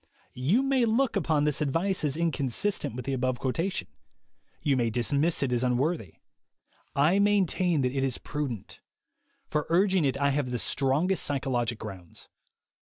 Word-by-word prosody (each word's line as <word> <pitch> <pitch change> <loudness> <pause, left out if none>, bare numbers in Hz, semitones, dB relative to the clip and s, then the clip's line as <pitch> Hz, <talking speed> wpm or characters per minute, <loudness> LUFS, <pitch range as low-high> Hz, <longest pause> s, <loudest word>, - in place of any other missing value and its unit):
You 165 - +2
may 270 -3 +2
look 230 +3 +1
upon 160 -6 +1
this 150 0 0
advice 165 +7 0
as 150 0 0
inconsistent 165 - -1
with 125 -1 -6
the 135 - -2
above 130 -1 0
quotation. 165 +10 -2 0.8
You 140 -2 +2
may 120 -3 +1
dismiss 140 +8 +1
it 130 - -1
as 120 0 +1
unworthy. 125 - 0 0.8
I 155 +8 +3
maintain 185 -5 +2
that 125 +1 -1
it 135 - 0
is 130 -3 0
prudent. 140 -9 -5 0.7
For 150 -1 -2
urg 185 +4 +3
ing 185 -4 +3
it 135 -1 +1
I 140 0 +2
have 140 -2 -1
the 125 - -2
strongest 140 - +1
psychologic 125 -4 -1
grounds. 95 -6 -10
140 Hz, 160 wpm, -28 LUFS, 125-175 Hz, 0.8 s, I